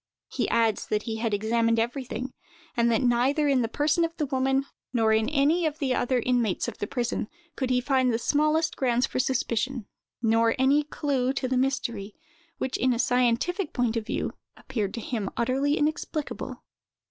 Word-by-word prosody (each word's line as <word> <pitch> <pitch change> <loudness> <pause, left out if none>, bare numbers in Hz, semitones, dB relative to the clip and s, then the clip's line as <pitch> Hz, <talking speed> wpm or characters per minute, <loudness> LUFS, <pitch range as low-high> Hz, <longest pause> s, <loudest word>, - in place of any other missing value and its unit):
He - - -1
adds 225 -2 +1
that 210 0 0
he 225 -2 -3
had 225 0 -1
examined 230 +2 +1
everything; 250 +2 -2 0.4
and 235 -1 +3
that 230 +3 +2
neither 255 +5 +2
in 270 -3 +3
the 230 - 0
person 300 +7 +1
of 330 0 -2
the 300 - 0
woman, 270 0 +1 0.3
nor 225 -3 +3
in 220 +2 +2
any 310 +4 +2
other 300 - -3 0.2
of - - 0
the 250 -2 +1
inmates 240 -6 +1
of - - -6
the 205 - -2
prison, 240 -4 -2 0.3
could 260 -2 -2
he 250 -1 +3
find 260 -1 +2
the 225 - +1
smallest 305 +5 +1
grounds 250 -1 +2
for - - -3
suspicion, 255 -2 -1 0.3
nor 230 0 +3
any 270 +3 +4
clew 275 -3 -1
to 265 - -2
the 255 - 0
mystery, 235 -6 -1 0.4
which, 260 - -2
in 255 0 +2
a - - -2
scientific 250 - +1
point 245 -3 0
of 225 -1 -2
view, - - -2 0.3
appeared 210 -4 -3
to 230 - -4
him 215 -4 -3
utterly 265 +5 +1
inexplicable. 305 0 -3
250 Hz, 180 wpm, -27 LUFS, 230-275 Hz, 0.4 s, any